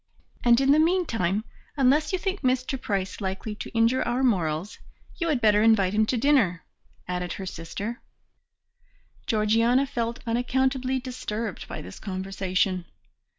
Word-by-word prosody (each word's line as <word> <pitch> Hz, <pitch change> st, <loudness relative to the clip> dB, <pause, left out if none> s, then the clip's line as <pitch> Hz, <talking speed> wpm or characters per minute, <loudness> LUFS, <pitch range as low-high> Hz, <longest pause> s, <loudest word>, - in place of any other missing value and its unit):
"And 235 Hz, 0 st, +5 dB
in 270 Hz, 0 st, +4 dB
the 300 Hz, -, +5 dB
meantime, 230 Hz, -, +1 dB, 0.3 s
unless 285 Hz, +3 st, +3 dB
you 375 Hz, -, +1 dB
think 385 Hz, +1 st, -3 dB
Mr. 255 Hz, 0 st, 0 dB
Price 195 Hz, -2 st, -2 dB
likely 195 Hz, +2 st, -3 dB
to 210 Hz, -, -7 dB
injure 230 Hz, +3 st, +2 dB
our 245 Hz, +2 st, 0 dB
morals, 175 Hz, -6 st, 0 dB, 0.4 s
you 335 Hz, -1 st, -1 dB
had 290 Hz, -5 st, +2 dB
better 210 Hz, -1 st, +4 dB
invite 210 Hz, -4 st, +4 dB
him 215 Hz, +1 st, +2 dB
to 250 Hz, -, 0 dB
dinner," 225 Hz, -, +2 dB, 0.4 s
added 180 Hz, -1 st, -3 dB
her 195 Hz, -, -6 dB
sister. 195 Hz, +7 st, -6 dB, 1.3 s
Georgiana 230 Hz, +4 st, +3 dB
felt 235 Hz, -3 st, -3 dB
unaccountably 260 Hz, +2 st, 0 dB
disturbed 230 Hz, -5 st, -5 dB
by -, -, -7 dB
this 95 Hz, -, -10 dB
conversation. 190 Hz, -1 st, -1 dB
230 Hz, 140 wpm, -26 LUFS, 195-260 Hz, 1.3 s, And